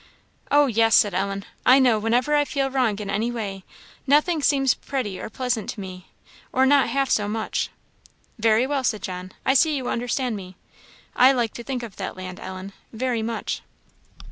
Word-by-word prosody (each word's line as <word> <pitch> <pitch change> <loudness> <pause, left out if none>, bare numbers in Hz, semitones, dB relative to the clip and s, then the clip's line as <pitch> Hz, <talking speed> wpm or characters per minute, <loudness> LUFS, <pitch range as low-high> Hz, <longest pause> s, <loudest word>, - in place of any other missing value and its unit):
"Oh, 290 0 +5
yes!" 225 -3 +3
said 205 -3 +4
Ellen. 195 +1 -2 0.2
"I 255 - +7
know, 250 -5 +4
whenever 240 +6 +1
I 295 0 +4
feel 275 -2 -2
wrong 250 -6 +1
in 210 -1 -6
any 210 +4 -1
way, 200 -5 -5 0.4
nothing 300 +3 +3
seems 270 -2 +3
pretty 245 -9 -4
or - - -6
pleasant 245 -3 -2
to - - -5
me, 185 -1 -8 0.4
or 260 +1 +3
not 280 0 +4
half 275 0 +1
so 205 -1 +2
much." 220 +1 -2 0.7
"Very 225 +2 +3
well," 275 -1 -1
said 215 -4 -1
John 185 0 -6
"I 265 - +4
see 305 +2 +4
you 260 -3 -3
understand 245 0 -1
me. 185 -2 -9 0.6
I 260 +2 +6
like 240 -4 -1
to 235 - -8
think 255 -1 -4
of 220 -5 -9
that - - -5
land, 185 0 -7
Ellen 190 +1 -8 0.2
very 240 0 -1
much." 230 +1 -3
235 Hz, 185 wpm, -24 LUFS, 205-265 Hz, 0.7 s, I